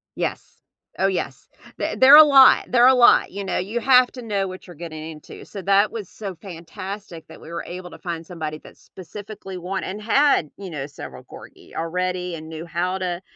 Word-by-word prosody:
Yes, - - -5 0.4
oh 195 - +3
yes. 190 - -4 0.3
Th - - -2
there 260 +2 +8
are - - +11
a 310 - +11
lot, 275 -3 +6
there 240 -1 +4
are - - +8
a 260 - +7
lot, 245 -1 +5
you 200 +1 -5
know, - - -2
you 210 +6 -2
have 255 0 +5
to 250 - -8
know 205 -4 -2
what 185 0 -9
you're 175 - -12
getting 160 -1 -8
into. 150 -1 -12
So 200 - -8
that 200 +2 +3
was 215 -6 -7
so 200 -4 -7
fantastic 175 +1 -9
that - - -13
we - - -12
were 170 0 -5
able 180 0 -8
to - - -12
find 170 -2 -5
somebody 155 -3 -6
that - - -16
specifically 195 +1 -10
want 185 +2 -4
and 205 +3 -6
had, 270 - +2
you 195 -2 -8
know, 145 -4 -5
several 145 - -10
corgi - - -15
already 180 +1 -3
and 160 -1 -9
knew 160 +1 -7
how 175 +3 -2
to, 180 -1 -3
185 Hz, 215 wpm, -22 LUFS, 170-210 Hz, 0.4 s, are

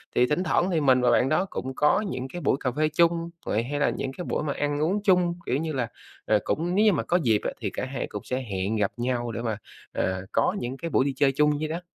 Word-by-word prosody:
thì 125 - +5
thỉnh 150 +6 0
thoảng 180 0 +2
thì 165 - +2
mình 130 -2 +4
và 125 - +3
bạn 130 - +3
đó 165 +5 +2
cũng 130 +1 -4
có 150 +8 +3
những 130 +1 -4
cái 175 - -5
buổi 140 - +2
cà 130 - -1
phê 155 +4 +1
chung 170 +1 +2 0.2
vậy, 110 +2 0
hay 145 +4 -3
là 145 - +3
những 135 - -3
cái 180 - -5
buổi - - -1
mà 145 - -1
ăn 145 0 -1
uống 190 +7 0
chung, 180 -3 +3
kiểu 130 - 0
như 155 +1 -2
là, 125 -4 -1 0.4
rồi 110 - +4
cũng 175 +4 -1
nếu 210 +2 +4
như 215 - +6
mà - - 0
có 175 - +2
dịp 110 -4 +3
á - - -1
thì - - -1
cả - - -3
hai 135 +1 -4
cũng - - -7
sẽ 130 +1 -2
hẹn 100 -2 -2
gặp 105 -2 +1
nhau 120 -1 -1
để 115 - -4
mà, 110 -3 -2 0.3
ờ, 95 0 -2
có 185 - +2
những 125 +2 -4
cái 170 +4 -4
buổi 130 - +2
đi 140 - 0
chơi 135 +1 +3
chung 150 +1 +2
vậy 155 - -1
đó. 165 +3 -4
140 Hz, 285 wpm, -26 LUFS, 125-165 Hz, 0.4 s, như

